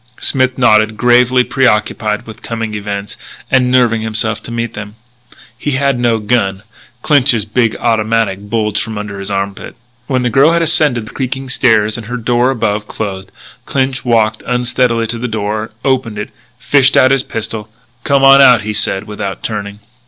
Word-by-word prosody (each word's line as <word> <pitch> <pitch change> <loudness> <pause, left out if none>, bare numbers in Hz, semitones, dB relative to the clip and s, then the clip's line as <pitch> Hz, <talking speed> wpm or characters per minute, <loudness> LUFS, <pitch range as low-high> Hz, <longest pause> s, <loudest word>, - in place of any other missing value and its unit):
Smith 130 -1 0
nodded, 110 -3 +3
gravely 125 +2 +3
preoccupied 105 -5 0
with 110 -2 -11
coming 115 -2 -4
events, 100 -1 -5 0.3
and 130 -1 +3
nerving 120 -3 +2
himself 110 0 -2
to - - -9
meet 115 -1 -3
them. 105 0 -8 0.6
He 145 +4 -3
had 135 -1 0
no 120 -2 +2
gun. 105 -3 -1 0.4
Clinch's 130 -7 +3
big 115 +1 0
automatic 110 -3 0
bulged 105 -1 -1
under 105 -2 -6
his 100 - -5
armpit. 100 0 -4 0.3
When 130 -2 0
the 120 - 0
girl 140 +7 +4
had 170 0 +2
ascended 150 -8 +1
the 110 - -11
creaking 130 0 -4
stairs 110 -4 +2
and 110 - -10
her 125 +1 -4
door, 120 +2 +1
above, 105 -4 -1
closed, 95 -3 -5 0.4
Clinch 135 -1 -1
walked 110 -3 +1
unsteadily 125 -1 0
to 115 +1 -3
the 125 - -3
door, 110 0 -3 0.2
opened 130 -5 0
it, 105 - -5 0.3
fished 135 +2 +3
out 130 - +5
his 135 -1 +3
pistol. 110 -2 -5 0.3
"Come 140 -1 +2
on 135 0 +8
out," 125 -5 +6
he 110 +1 -3
said 95 -1 0
without 105 -3 -6
turning. 105 -1 -5
115 Hz, 165 wpm, -14 LUFS, 105-125 Hz, 0.6 s, on